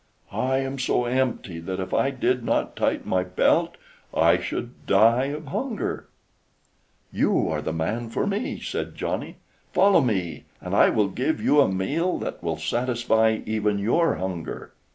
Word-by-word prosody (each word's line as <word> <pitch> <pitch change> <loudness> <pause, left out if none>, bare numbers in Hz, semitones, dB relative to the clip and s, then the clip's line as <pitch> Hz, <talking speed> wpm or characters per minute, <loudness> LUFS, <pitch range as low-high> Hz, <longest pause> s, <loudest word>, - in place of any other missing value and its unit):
I 130 +1 0
am 135 0 -3
so 125 -1 +1
empty 120 -8 -1
that 95 +3 -5
if 95 - -4
I 135 - +2
did 125 -2 0
not - - 0
tighten - - -1
my 90 -1 +1
belt 90 0 +2 0.4
I - - +4
should 120 +1 -6
die 115 +6 +5
of 150 +3 -5
hunger." 235 - -3 1.0
"You - - +1
are 75 -2 -1
the 80 - -3
man 105 +9 -2
for 115 - -1
me!" 205 +3 -2
said - - -4
Johnny. - - -3 0.4
"Follow 190 -1 +5
me, 95 - -2
and - - -6
I - - +6
will 105 -2 +2
give 130 +11 -1
you 145 0 +4
a 95 - +3
meal 145 - 0
that - - -5
will - - -2
satisfy 120 -2 +1
even 105 -1 0
your 120 +12 +2
hunger." 90 -3 -5
120 Hz, 160 wpm, -25 LUFS, 95-135 Hz, 1.0 s, I